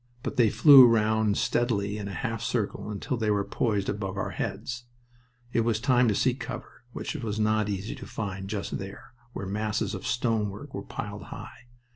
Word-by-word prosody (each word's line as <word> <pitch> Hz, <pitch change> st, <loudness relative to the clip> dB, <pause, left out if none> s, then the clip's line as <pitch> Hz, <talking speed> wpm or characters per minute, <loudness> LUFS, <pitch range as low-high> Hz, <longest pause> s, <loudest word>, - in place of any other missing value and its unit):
But -, -, -3 dB
they 120 Hz, -4 st, +5 dB
flew 135 Hz, +1 st, +9 dB
round 110 Hz, -2 st, +2 dB
steadily 105 Hz, -4 st, 0 dB
in 100 Hz, -, -4 dB
a 100 Hz, -, -5 dB
half 115 Hz, -4 st, -3 dB
circle 115 Hz, -3 st, -2 dB
until 105 Hz, +4 st, -3 dB
they 110 Hz, -2 st, 0 dB
were 100 Hz, -1 st, +2 dB
poised 100 Hz, -1 st, 0 dB
above 95 Hz, -2 st, -3 dB
our -, -, -2 dB
heads. 120 Hz, +4 st, -4 dB, 0.7 s
It -, -, +3 dB
was 115 Hz, -1 st, +1 dB
time 125 Hz, 0 st, +3 dB
to 105 Hz, -, +2 dB
seek 125 Hz, +4 st, +1 dB
cover, 120 Hz, -, -8 dB
which -, -, -4 dB
was 110 Hz, -3 st, -3 dB
not 110 Hz, -1 st, +2 dB
easy 100 Hz, +2 st, -3 dB
to -, -, -9 dB
find 95 Hz, -2 st, -4 dB
just 105 Hz, -1 st, -3 dB
there, 95 Hz, +3 st, -9 dB, 0.2 s
where -, -, -5 dB
masses 105 Hz, +2 st, -1 dB
of -, -, -5 dB
stonework 115 Hz, +2 st, -1 dB
were 100 Hz, -, -4 dB
piled 100 Hz, 0 st, -6 dB
high. 120 Hz, -, -10 dB
110 Hz, 185 wpm, -27 LUFS, 100-120 Hz, 0.7 s, flew